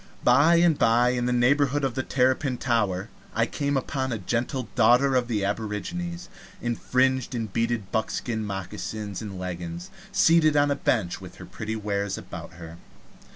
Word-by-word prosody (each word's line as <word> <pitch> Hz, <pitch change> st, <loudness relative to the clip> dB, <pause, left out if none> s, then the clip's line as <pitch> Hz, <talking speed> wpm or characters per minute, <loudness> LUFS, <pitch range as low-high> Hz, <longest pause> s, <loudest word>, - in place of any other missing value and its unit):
By 140 Hz, +7 st, +5 dB
and 170 Hz, -3 st, +4 dB
by, 120 Hz, +2 st, +4 dB
in 125 Hz, -1 st, 0 dB
the -, -, +1 dB
neighborhood 140 Hz, +3 st, +2 dB
of 135 Hz, -3 st, 0 dB
the 130 Hz, -, -1 dB
Terrapin 130 Hz, +1 st, +1 dB
Tower, 105 Hz, -5 st, 0 dB, 0.3 s
I 115 Hz, -, +3 dB
came 140 Hz, +3 st, -1 dB
upon 130 Hz, 0 st, -2 dB
a 115 Hz, -, -1 dB
gentle 120 Hz, +5 st, -2 dB
daughter 125 Hz, +3 st, +4 dB
of 125 Hz, -1 st, +2 dB
the 105 Hz, -5 st, -1 dB
aborigines 115 Hz, -, -4 dB, 0.3 s
in 120 Hz, -1 st, -2 dB
fringed 130 Hz, 0 st, +1 dB
and 110 Hz, -4 st, -4 dB
beaded 115 Hz, -3 st, -1 dB
buckskin 110 Hz, 0 st, -2 dB
moccasins 100 Hz, +1 st, -5 dB
and 100 Hz, -3 st, -6 dB
leggins, 90 Hz, -1 st, -6 dB, 0.2 s
seated 155 Hz, -2 st, +4 dB
on 145 Hz, 0 st, +3 dB
a -, -, +2 dB
bench 105 Hz, -10 st, 0 dB
with -, -, -10 dB
her -, -, -10 dB
pretty 110 Hz, +1 st, -5 dB
wares 100 Hz, -2 st, -2 dB
about -, -, -9 dB
her. 80 Hz, 0 st, -10 dB
120 Hz, 165 wpm, -26 LUFS, 105-135 Hz, 0.3 s, By